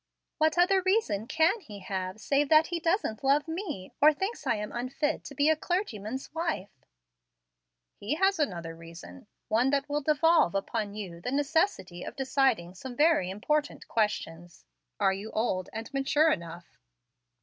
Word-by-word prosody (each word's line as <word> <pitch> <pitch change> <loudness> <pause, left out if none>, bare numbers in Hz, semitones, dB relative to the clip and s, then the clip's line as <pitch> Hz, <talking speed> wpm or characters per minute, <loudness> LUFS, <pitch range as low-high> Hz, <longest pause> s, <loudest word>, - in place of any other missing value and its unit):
"What 315 +2 +2
other 375 +2 +4
reason 375 - +1
can 320 - +2
he 215 - -11
have 185 +1 -4
save 280 +5 +1
that 310 0 +6
he 345 0 -3
doesn't 330 - -1
love 280 +4 +3
me, 325 - -5
or 305 +2 +8
thinks 385 +9 -4
I - - +3
am 210 0 -5
unfit 270 +5 -2
to 280 - -9
be 285 +2 +2
a 315 - +5
clergyman's 265 - -3
wife?" 320 - -2 1.3
"He 215 +9 -2
has 385 +1 +2
another 170 - -2
reason, 170 +9 -12 0.2
one 235 +4 +2
that 280 0 0
will 290 +1 -1
devolve 305 - +3
upon 205 +1 -2
you 180 -5 -7
the 250 - -3
necessity 290 - 0
of - - -7
deciding 265 -10 +1
some 245 +7 -8
very 300 - +3
important 290 +10 -2
questions. 175 -6 -2 0.3
Are 195 -2 +3
you 200 +3 -6
old 185 -5 -1
and 225 +4 -7
mature 290 +3 +3
enough?" 170 - -6
270 Hz, 160 wpm, -29 LUFS, 200-315 Hz, 1.3 s, or